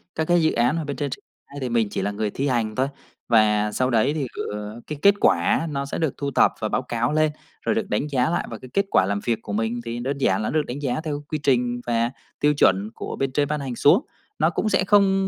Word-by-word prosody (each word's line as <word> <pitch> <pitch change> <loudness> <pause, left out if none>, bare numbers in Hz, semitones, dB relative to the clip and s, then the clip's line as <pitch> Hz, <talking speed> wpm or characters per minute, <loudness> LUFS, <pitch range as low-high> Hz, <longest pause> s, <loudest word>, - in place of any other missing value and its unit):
Các 160 - 0
cái 175 -1 +4
dự 160 - +3
án 120 +5 +2
mà 165 - -2
bên 145 -1 -4
trên 145 -1 -2
triển 130 - -7 0.3
khai 140 - -9
thì 130 - -2
mình 115 -2 +2
chỉ - - -3
là 100 - -1
người 105 +1 -2
thi 140 +6 -2
hành 115 -5 0
thôi. 130 +3 +1 0.4
Và 105 -2 +3
sau 130 +4 0
đấy 125 +4 +2
thì 145 -4 -2
gửi 105 +2 -5
cái 150 - -5
kết 200 +3 +6
quả - - +4
á, 125 - +1
nó 140 -2 -2
sẽ 140 - -4
được 160 -5 0
thu 140 -1 -3
thập - - +4
và 110 - -2
báo - - 0
cáo 120 +1 -1
lên 155 0 +3 0.3
rồi - - 0
được - - -2
đánh 105 +8 0
giá 130 -2 +1
lại. 170 - -1
Và 115 - -6
cái 130 - -12
kết 200 - +2
quả 95 - +4
làm 100 +1 -1
việc 115 -2 0
của 105 - -6
mình 115 +3 -1
thì 115 +1 -4
đơn 135 +3 -2
giản 100 -7 +1
là 110 - -1
nó - - -4
được 150 - -2
đánh 125 +4 -5
giá 130 0 -1
theo 150 -2 -4
quy 155 - -1
trình 120 -3 +1
và 115 0 +1 0.3
tiêu 150 0 +3
chuẩn 100 -4 +3
của - - -5
bên 135 -1 -1
trên 145 +2 +1
ban 150 +1 -1
hành 135 -3 -4
xuống. 170 - +4 0.3
Nó - - +4
cũng 215 - -1
sẽ 190 -2 +2
không, 195 -1 +4
130 Hz, 285 wpm, -23 LUFS, 115-150 Hz, 0.4 s, kết